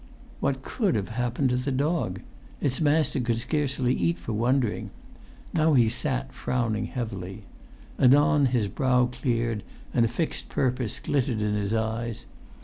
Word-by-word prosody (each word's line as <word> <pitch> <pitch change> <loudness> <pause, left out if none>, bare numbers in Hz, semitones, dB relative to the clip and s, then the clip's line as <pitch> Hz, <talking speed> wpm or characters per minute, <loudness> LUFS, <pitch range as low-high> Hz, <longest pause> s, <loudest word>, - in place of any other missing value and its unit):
What 135 -1 -1
could 205 - 0
have 100 -3 -1
happened 125 +3 0
to 125 - +2
the 125 +2 -1
dog? 135 - 0 0.4
Its 130 0 -1
master 150 -1 +2
could 120 -2 0
scarcely 130 0 0
eat 85 -4 +1
for 90 +6 -5
wondering. 120 +1 +1 0.6
Now 155 -2 +3
he 120 -3 +5
sat 130 +2 -2
frowning 115 -4 -1
heavily. 105 -6 -5 0.6
Anon 145 +2 +5
his 120 -5 +1
brow 125 +4 +2
cleared, 120 -3 -1 0.3
and 120 - +4
a - - +4
fixed 140 +8 -3
purpose 125 -4 -1
glittered 130 -5 0
in 105 0 0
his 105 +1 0
eyes. 110 +1 -2
125 Hz, 145 wpm, -26 LUFS, 110-135 Hz, 0.6 s, he